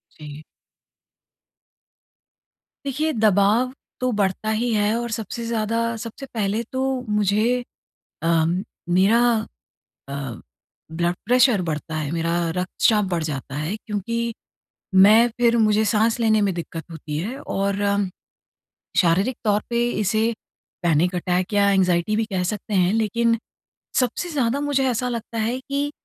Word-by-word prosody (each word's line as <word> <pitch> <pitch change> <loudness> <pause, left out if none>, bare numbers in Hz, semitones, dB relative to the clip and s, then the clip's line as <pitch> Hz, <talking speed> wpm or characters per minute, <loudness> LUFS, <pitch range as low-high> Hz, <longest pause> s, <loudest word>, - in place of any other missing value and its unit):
जी। 150 0 -10 2.4
देखिए, 300 +4 0
दबाव 215 +3 +3 0.3
तो 255 0 0
बढ़ता 205 +1 -1
ही 225 +2 0
है 210 +1 +2
और 235 -1 -3
सबसे 230 +1 -4
ज़्यादा 230 0 -1 0.2
सबसे 230 +4 -7
पहले 215 0 0
तो 260 0 -2 0.3
मुझे 210 +4 +2 0.6
अ, 165 -1 +3 0.4
मेरा 195 +6 +4 0.9
अ, 140 -4 -5 0.5
ब्लड 170 +2 0
प्रेशर 245 -5 +4
बढ़ता 155 +1 -3
है, 150 -2 -2
मेरा 170 0 0 0.2
रक्तचाप 205 +3 +2
बढ़ 170 - 0
जाता 135 -3 -5
है 155 +8 -2
क्योंकि 230 +3 -2 0.7
मैं 225 +3 +6
फिर 235 -1 +3
मुझे 215 -1 +3
साँस 220 +3 +2
लेने 220 -1 +3
में 190 - 0
दिक्कत 165 -1 -6
होती 155 -2 -6
है 230 +11 -4
और 200 +1 -2
अम 200 -1 +1 0.9
शारीरिक 190 +8 +3
तौर 210 -1 +3
पे 235 0 +1
इसे 215 +2 +1 0.5
पैनिक 175 +2 +2
अटैक 180 +3 -1
या 200 -1 +4
एंग्ज़ायटी 185 +1 +2
भी 225 - +1
कह 190 -4 -2
सकते 210 +2 -3
हैं। 185 +1 +3
लेकिन 230 +1 +2 0.6
सबसे 255 +8 -1
ज़्यादा 275 -3 0
मुझे 285 -2 +1
ऐसा 250 +1 -1
लगता 230 -1 -5
है 235 +4 -1
कि 280 +2 -2
215 Hz, 135 wpm, -22 LUFS, 180-235 Hz, 2.4 s, मैं